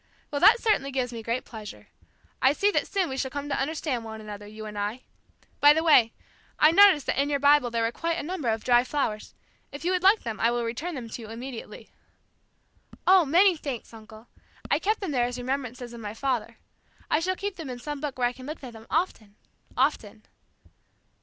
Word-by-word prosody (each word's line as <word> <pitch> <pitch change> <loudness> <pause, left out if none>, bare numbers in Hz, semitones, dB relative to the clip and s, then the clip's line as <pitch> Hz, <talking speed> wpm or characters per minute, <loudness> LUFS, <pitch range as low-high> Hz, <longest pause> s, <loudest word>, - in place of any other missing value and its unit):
"Well, 285 - -2
that 420 +6 +7
certainly 420 -13 +1
gives 255 -2 -2
me 230 - -6
great 230 +3 -3
pleasure. 215 -3 -10 0.5
I 265 +1 +5
see 405 +7 +2
that - - 0
soon 385 -3 0
we 265 - -5
shall 265 - -2
come 285 +2 -5
to 280 - -1
understand 280 -4 -2
one 220 -1 -8
another, 210 -1 -9
you 215 +1 -9
and 210 -1 -8
I. 210 +5 -3 0.6
By 290 0 +8
the 320 +1 0
way, 245 -9 +5 0.5
I 305 - +6
noticed 375 -6 +6
that 275 - +1
in 285 - -1
your 285 - +1
Bible 285 -2 +4
there 230 -1 -1
were 230 - 0
quite 335 +6 -2
a - - -3
number 310 -6 -3
of 220 0 -1
dry 245 -1 +4
flowers. 250 -6 -3 0.4
If 285 +4 -8
you 360 - +2
would 365 -1 +1
like 395 +4 +4
them, 225 -2 -5
I 230 - +3
will 240 0 -1
return 300 +10 -4
them 245 -4 -6
to 235 - -7
you 220 - -10
immediately." 240 +2 -8 1.1
"Oh, 370 -2 +6
many 355 +6 +5
thanks, 275 -7 -6
uncle. 220 +1 -13 0.4
I - - +3
kept 425 +2 0
them 380 -6 -3
there 245 -3 +1
as 245 0 -4
remembrances 250 -1 -4
of 235 - -9
my 210 0 -6
father. 235 -2 -2 0.5
I 305 - +4
shall 370 +3 -1
keep 400 0 -5
them 320 -6 -7
in 250 - -5
some 290 +3 -6
book 290 -4 -4
where 245 -1 +2
I 245 - -4
can 255 +1 -11
look 305 -1 -7
at 250 -2 -8
them 225 0 -13
often 250 - -2 0.4
often!" 230 -6 -1
260 Hz, 220 wpm, -26 LUFS, 230-310 Hz, 1.1 s, By